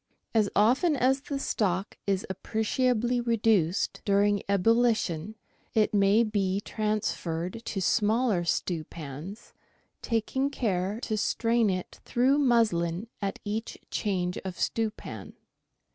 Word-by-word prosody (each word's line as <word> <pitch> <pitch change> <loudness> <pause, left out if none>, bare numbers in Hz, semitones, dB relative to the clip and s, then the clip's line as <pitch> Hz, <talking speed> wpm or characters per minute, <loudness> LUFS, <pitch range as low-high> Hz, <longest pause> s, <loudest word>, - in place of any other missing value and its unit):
As 215 -3 +3
often 260 - +4
as 265 +1 +2
the 280 0 -4
stock 195 -6 -1
is 195 -1 0
appreciably 240 +5 0
reduced, 220 -7 +1
during 205 0 +2
ebullition, 215 -3 +2 0.4
it 215 -1 +3
may 205 +2 +4
be 200 -3 0
transferred 210 -3 -2
to 195 - -3
smaller 215 -1 +2
stewpans, 165 - -4 0.5
taking 245 +4 0
care 205 -6 -1
to 220 -3 -2
strain 230 +1 +2
it 185 -1 -4
through 260 +4 +2
muslin 220 - +2
at 195 -1 -2
each 215 +2 -3
change 180 -4 -1
of 185 -2 -7
stewpan. 225 -2 -3
210 Hz, 110 wpm, -28 LUFS, 190-235 Hz, 0.5 s, often